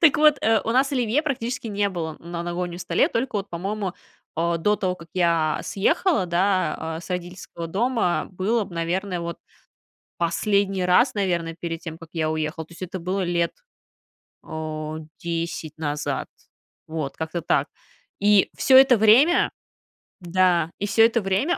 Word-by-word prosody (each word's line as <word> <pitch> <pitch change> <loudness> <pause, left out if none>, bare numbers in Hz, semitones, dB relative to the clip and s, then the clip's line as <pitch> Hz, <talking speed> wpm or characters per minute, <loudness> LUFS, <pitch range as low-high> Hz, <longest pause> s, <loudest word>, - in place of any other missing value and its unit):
так 320 -4 +6
вот, 300 -1 +5
э, 220 -2 +3
у - - -1
нас 265 +4 +2
оливье 250 +2 +1
практически 250 -5 -3
не 205 -1 0
было 165 -4 -4
на 170 0 -6
новогоднем 175 0 -4
столе. - - +1
Только 230 -1 -2
вот, 200 0 -3
по-моему, 195 +2 -3 0.4
а, 170 +1 +1
до 210 +5 +2
того, 185 -3 -1
как 170 -2 -14
я 165 -4 +2
съехала, 205 - +1
да, 185 +2 +1 0.2
а, - - -6
с 175 - -12
родительского 180 -1 -5
дома, 195 -3 0
было 205 +4 0
б, 175 - -12
наверное, 180 +2 -2
вот 170 -1 -5 0.8
последний 195 +2 +1
раз, 180 +9 +4
наверное, 175 -5 -1
перед 165 -1 -4
тем, 165 -2 -7
как 165 -1 -12
я 155 -2 -1
уехала. 155 +1 -3
То 170 - -17
есть 170 - -12
это 185 +1 -4
было 185 +3 -1
лет, 175 -1 0 0.9
о, 155 0 -5 0.2
10 170 -2 -4
назад. 150 -1 -2 0.6
Вот, 155 -3 -4
как-то 160 +2 -3
так. - - +1 0.5
И 205 -1 +4
всё 260 -1 +6
это 265 -2 +7
время 235 - +5 0.7
да, 175 -2 +2
и 205 - -1
всё 225 +2 +4
это 235 0 +2
время 200 - +1
180 Hz, 160 wpm, -24 LUFS, 170-210 Hz, 0.9 s, это